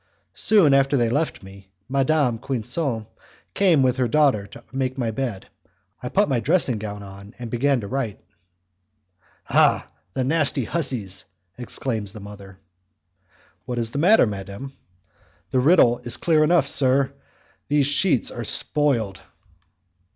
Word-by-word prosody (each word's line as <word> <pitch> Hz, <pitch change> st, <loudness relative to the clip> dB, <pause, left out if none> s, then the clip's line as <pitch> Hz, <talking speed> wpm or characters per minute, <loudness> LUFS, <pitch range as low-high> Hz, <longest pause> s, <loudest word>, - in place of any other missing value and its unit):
Soon 195 Hz, -10 st, +4 dB
after 135 Hz, +1 st, +3 dB
they 120 Hz, -, +2 dB
had 115 Hz, 0 st, 0 dB
left 155 Hz, -7 st, -2 dB
me, 95 Hz, 0 st, -14 dB, 0.2 s
Madame 135 Hz, -2 st, +1 dB
Quinson 125 Hz, -1 st, -2 dB, 0.5 s
came 175 Hz, -8 st, +3 dB
with 130 Hz, 0 st, +1 dB
her 125 Hz, -2 st, +1 dB
daughter 130 Hz, -7 st, +2 dB
to -, -, -14 dB
make 130 Hz, 0 st, -3 dB
my 120 Hz, -3 st, -1 dB
bed. 110 Hz, -5 st, -4 dB, 0.5 s
I 125 Hz, -, -5 dB
put 205 Hz, +8 st, +2 dB
my 130 Hz, -4 st, 0 dB
dressing 130 Hz, -, +1 dB
gown 105 Hz, -1 st, -7 dB
on, 100 Hz, +2 st, -12 dB
and 120 Hz, -2 st, -8 dB
began 135 Hz, +1 st, +1 dB
to 100 Hz, -, -7 dB
write. 120 Hz, -4 st, -3 dB, 1.3 s
"Ah! -, -, +3 dB, 0.3 s
the 130 Hz, -, 0 dB
nasty 145 Hz, -1 st, +1 dB
hussies!" 115 Hz, -, -3 dB, 0.3 s
exclaims 115 Hz, -4 st, -4 dB
the 110 Hz, -, -9 dB
mother. 100 Hz, -1 st, -12 dB, 1.1 s
"What 125 Hz, -1 st, -5 dB
is 115 Hz, -1 st, -1 dB
the 140 Hz, -, -3 dB
matter, 190 Hz, -, +5 dB
madam?" 100 Hz, +5 st, -7 dB, 0.8 s
"The 130 Hz, -, +2 dB
riddle 125 Hz, -4 st, +4 dB
is 120 Hz, -, -3 dB
clear 155 Hz, -2 st, +2 dB
enough, 155 Hz, -2 st, +3 dB
sir; 135 Hz, -1 st, +3 dB, 0.5 s
these 145 Hz, -1 st, +2 dB
sheets 145 Hz, -1 st, +2 dB
are 120 Hz, -, -6 dB
spoiled." 115 Hz, -, +1 dB
130 Hz, 145 wpm, -22 LUFS, 110-145 Hz, 1.3 s, matter